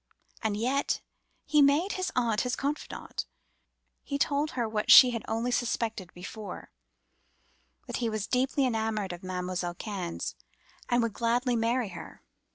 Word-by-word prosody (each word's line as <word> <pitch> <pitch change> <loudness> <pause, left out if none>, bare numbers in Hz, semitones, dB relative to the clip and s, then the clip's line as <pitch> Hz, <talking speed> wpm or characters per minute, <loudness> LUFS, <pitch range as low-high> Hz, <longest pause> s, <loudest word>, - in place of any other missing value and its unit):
And 215 -2 0
yet 260 +6 0 0.5
he 300 -1 +4
made 290 +8 +4
his 370 0 -2
aunt 230 -3 +2
his 250 0 -1
confidante—told 285 0 -4
her 235 -2 +1
what 215 -1 -2
she 250 -2 +10
had 230 -2 -3
only 230 +2 -1
suspected 225 -6 -1
before—that 200 +4 -11
he 235 -2 0
was 215 -2 -2
deeply 265 +2 +1
enamoured 220 -5 -1
of 175 - -9
Mam'selle 180 -1 -3
Cannes, 185 -4 -4 0.6
and 240 -1 +3
would 230 -2 -1
gladly 240 +2 +1
marry 230 0 +1
her. 180 - -10
230 Hz, 130 wpm, -29 LUFS, 210-255 Hz, 0.6 s, she